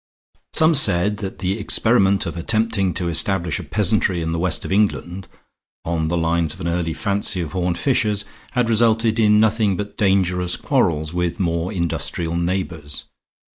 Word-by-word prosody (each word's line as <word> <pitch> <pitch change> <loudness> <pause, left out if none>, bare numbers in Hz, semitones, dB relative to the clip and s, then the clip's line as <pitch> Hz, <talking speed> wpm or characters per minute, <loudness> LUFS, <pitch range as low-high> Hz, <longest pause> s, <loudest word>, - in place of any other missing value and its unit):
Some 160 +1 +4
said 105 - +2
that 95 -2 -6
the 95 +4 -2
experiment 100 -2 +3
of 85 - -5
attempting 100 +1 0
to 90 -2 -2
establish 85 -1 0
a - - -6
peasantry 100 -3 +1
in 80 0 -2
the 85 - -2
west 90 -2 -1
of - - -5
England, 95 -2 0 0.6
on 80 -1 -1
the 85 +2 -1
lines 85 -1 0
of - - -16
an 85 - -3
early 85 -1 -1
fancy 100 -2 0
of 80 -4 -4
Horne 90 0 -1
Fisher's, 105 -1 0 0.3
had 125 -2 +1
resulted 115 0 +2
in 105 -1 +5
nothing 110 -3 +2
but 105 0 -6
dangerous 90 -3 +1
quarrels 80 -1 0
with 90 -1 -2
more 85 0 -1
industrial 85 -2 -2
neighbors. 85 -4 -3
95 Hz, 165 wpm, -20 LUFS, 85-105 Hz, 0.6 s, in